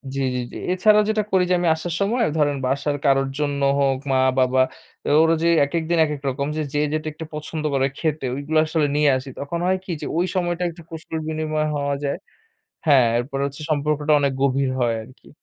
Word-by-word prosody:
জি, - - -2 0.2
জি, - - -1
জি। - - -11 0.2
এছাড়াও 210 +3 +4
যেটা 215 -1 +1
করি 190 -1 +4
যে, - - +3
আমি 175 - 0
আসার 165 +2 -5
সময় 230 +5 +1
ধরেন 145 -2 +2
বাসার 140 +3 0
কারোর 135 -1 +3
জন্য 145 -1 -1 0.2
হোক, 135 -1 +2
মা-বাবা, 130 0 +3 0.4
বা - - 0
ওর 160 - +4
যে, 170 - +2 0.2
একেক 165 +3 -2
দিন 170 - +2
একেক 150 -2 -4
রকম, 140 +2 -2
যে, - - 0 0.3
যেটা 155 0 -2
একটু 160 +1 -8
পছন্দ 155 +1 -5
করে 135 0 +2
খেতে, 155 -3 -2
ঐগুলা 145 +3 0
আসলে 155 -1 +1
নিয়ে 150 0 +4
আসি। 130 +1 -8
তখন 145 +4 -3
হয় 190 +1 +2
কী? 190 - -6
যে, - - -4
ওই 175 - +2
সময়টা 175 -1 -1
একটু 170 +1 -11
কুশল 160 -1 -6
বিনিময় 155 -1 -1
হওয়া 140 -1 -1
যায় 140 +2 -1 0.7
হ্যাঁ, 135 -5 +6
এরপরে 135 +3 -3
হচ্ছে, 140 +2 -7
সম্পর্কটা 150 0 +1
অনেক 140 -1 +1
গভীর 135 0 +2
হয় 120 -2 +2
আরকি। 130 +4 -17
150 Hz, 200 wpm, -22 LUFS, 140-165 Hz, 0.7 s, হ্যাঁ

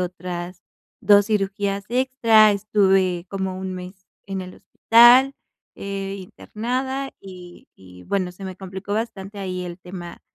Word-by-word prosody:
otras 180 0 -5 0.4
2 205 0 +5
cirugías 200 -1 -1
extra, 235 -4 +4
estuve 190 -3 +1
como 190 -1 -3
un 190 0 -5
mes 185 +1 -10 0.2
en 195 -1 -4
el 185 0 -10
hospital, 240 +6 +5 0.4
eh, 195 0 -5
internada, 255 +8 -4
y 180 -2 -13
y, 90 -1 -15
bueno, 190 -3 -1
se 190 +2 -11
me 185 -1 -7
complicó 190 +1 -7
bastante 205 -3 -5
ahí 185 -2 -4
el 175 0 -7
tema 180 -1 -9
195 Hz, 135 wpm, -22 LUFS, 185-210 Hz, 0.4 s, 2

